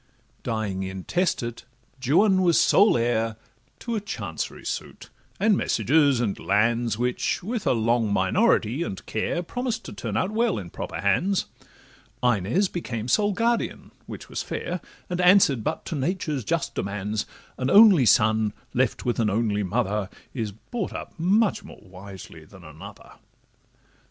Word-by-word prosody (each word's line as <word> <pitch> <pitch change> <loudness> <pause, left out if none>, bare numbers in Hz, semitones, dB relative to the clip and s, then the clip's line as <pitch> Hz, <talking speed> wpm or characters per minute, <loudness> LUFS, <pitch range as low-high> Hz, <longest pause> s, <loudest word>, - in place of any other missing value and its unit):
Dying 110 -4 -3
intestate, 120 - -2 0.4
Juan 185 - +4
was 175 -3 +4
sole 205 - +5
heir 115 -1 0 0.5
To 235 - -4
a 215 - -1
chancery 205 - -5
suit, - - -6 0.3
and 210 +1 +4
messuages, 140 - +2
and 110 -5 -1
lands, 115 +4 +1
Which, 125 +6 -1
with 225 +2 -3
a - - +4
long 115 -1 +1
minority 120 - +2
and 100 - -5
care, 170 +10 -2
Promised 240 +3 -3
to - - -7
turn - - -4
out 190 - 0
well 225 -2 +1
in 90 -4 -7
proper - - -6
hands: 175 - +1 0.8
Inez 120 - +2
became 120 -11 -5
sole 205 - +2
guardian, 230 +3 -1 0.2
which - - -8
was - - -4
fair, - - -4 0.3
And 180 0 -2
answer'd 180 - +5
but 155 - -3
to 165 - -4
nature's 150 -2 -2
just - - -1
demands; 105 +1 -3 0.3
An 130 +1 0
only 200 - +7
son 110 0 +3 0.2
left 125 -1 0
with 120 -1 0
an 110 -2 +2
only 105 0 0
mother 100 +1 -1 0.2
Is 110 -5 -3
brought 195 - -6
up - - -7
much 200 +5 +2
more - - -12
wisely 95 -3 -12
than 95 +3 -16
another. 85 +7 -12
120 Hz, 145 wpm, -25 LUFS, -, 0.8 s, only